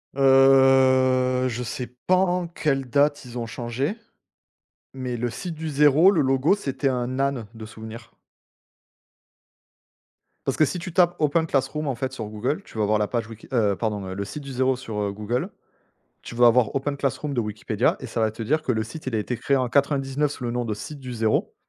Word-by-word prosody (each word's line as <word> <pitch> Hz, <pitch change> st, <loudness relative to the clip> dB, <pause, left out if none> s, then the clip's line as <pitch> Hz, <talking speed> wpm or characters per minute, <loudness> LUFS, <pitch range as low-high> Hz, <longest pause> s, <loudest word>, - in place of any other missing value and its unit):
Heu, 130 Hz, -1 st, +5 dB
je 120 Hz, +1 st, -4 dB
sais 125 Hz, +1 st, -4 dB, 0.2 s
pas 185 Hz, -, +5 dB
en 180 Hz, -1 st, +1 dB
quelle 135 Hz, -6 st, -1 dB
date 145 Hz, +1 st, +2 dB
ils 125 Hz, 0 st, -8 dB
ont 115 Hz, -, -3 dB
changé, 120 Hz, -, -3 dB, 1.0 s
mais 130 Hz, -2 st, -4 dB
le 120 Hz, +1 st, -2 dB
site 170 Hz, -, -6 dB
du 160 Hz, 0 st, -5 dB
0, 150 Hz, +6 st, +5 dB
le 170 Hz, -, +1 dB
logo, 135 Hz, +5 st, +3 dB
c'était 135 Hz, -7 st, -2 dB
un 125 Hz, 0 st, -2 dB
âne 135 Hz, -5 st, 0 dB
de 110 Hz, -1 st, -9 dB
souvenir. 110 Hz, +2 st, -10 dB, 2.4 s
Parce -, -, -1 dB
que 155 Hz, -, +5 dB
si 180 Hz, -, -3 dB
tu 180 Hz, -1 st, -7 dB
tapes 175 Hz, -1 st, +4 dB
OpenClassrooms, 150 Hz, -1 st, 0 dB
en 135 Hz, -, -1 dB
fait, 130 Hz, +2 st, -4 dB
sur 110 Hz, -5 st, -5 dB
Google, 125 Hz, -, -3 dB
tu -, -, -13 dB
vas 105 Hz, -, +1 dB
avoir 105 Hz, +1 st, +2 dB
la 105 Hz, -, +1 dB
page 115 Hz, -3 st, -2 dB
Wiki 115 Hz, -1 st, -12 dB
heu, 105 Hz, -5 st, +2 dB
pardon, 105 Hz, -3 st, -3 dB
heu, 95 Hz, -, -5 dB
le 100 Hz, 0 st, -3 dB
site 145 Hz, +7 st, -7 dB
du 135 Hz, -, -8 dB
0 130 Hz, +1 st, +1 dB
sur, 115 Hz, -5 st, -6 dB
heu, 100 Hz, -1 st, -1 dB
Google, 105 Hz, +5 st, -3 dB, 0.7 s
tu -, -, -9 dB
vas 120 Hz, 0 st, +5 dB
avoir 120 Hz, -2 st, +3 dB
OpenClassrooms 140 Hz, +1 st, -2 dB
de 120 Hz, -, +1 dB
Wikipédia 105 Hz, -1 st, -1 dB
et -, -, -6 dB
ça 115 Hz, -, -3 dB
va 110 Hz, -1 st, +2 dB
te 115 Hz, +1 st, -8 dB
dire 155 Hz, +8 st, 0 dB
que 125 Hz, -, 0 dB
le 110 Hz, -1 st, 0 dB
site, 135 Hz, +7 st, -9 dB
il 125 Hz, -, -2 dB
a -, -, +2 dB
été 120 Hz, +3 st, -2 dB
créé 140 Hz, +4 st, +1 dB
en 130 Hz, -2 st, 0 dB
99 140 Hz, +1 st, +1 dB
sous 125 Hz, -, -8 dB
le 120 Hz, -, -1 dB
nom 120 Hz, 0 st, -2 dB
de 110 Hz, -2 st, -2 dB
«site 145 Hz, +7 st, -8 dB
du 130 Hz, -2 st, -7 dB
0» 110 Hz, -2 st, 0 dB
130 Hz, 210 wpm, -24 LUFS, 115-140 Hz, 2.4 s, Heu